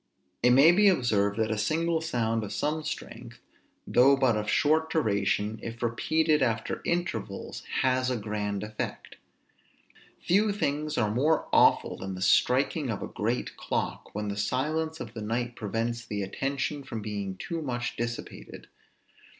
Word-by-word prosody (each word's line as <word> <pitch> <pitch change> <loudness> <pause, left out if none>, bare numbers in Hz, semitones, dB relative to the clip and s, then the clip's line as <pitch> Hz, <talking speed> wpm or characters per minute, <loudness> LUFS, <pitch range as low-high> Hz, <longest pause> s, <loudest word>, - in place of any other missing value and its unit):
It 125 - +5
may 135 +6 +7
be 205 +4 +5
observed 110 - +2
that 110 -1 0
a 110 - -1
single 160 +8 +1
sound 115 -8 -1
of 100 - -6
some 155 +1 -1
strength, 150 - -7 0.5
though 135 +3 +5
but 130 -4 +3
of 105 0 -2
short 155 +7 +2
duration, 105 -5 0
if 115 +1 -6
repeated 155 +6 +1
after 115 -3 -1
intervals, 110 - -3 0.2
has 130 0 +2
a 125 - 0
grand 105 -2 -3
effect. 105 0 -6 1.0
Few 205 +4 +2
things 150 -5 -2
are 105 -3 +1
more 150 +7 +2
awful - - +4
than 95 0 -5
the 90 - -8
striking 135 - +2
of 110 - -3
a - - -4
great 115 +4 -2
clock, - - -3
when 105 0 -2
the 100 - -4
silence 155 +8 -1
of 110 - -7
the 110 - -6
night 120 +3 -2
prevents 115 +2 -2
the 105 -3 -3
attention 135 +7 -2
from 115 -5 -6
being 100 -3 -4
too 165 - -4
much 120 -4 -3
dissipated. 115 0 -6
120 Hz, 155 wpm, -28 LUFS, 105-150 Hz, 1.0 s, may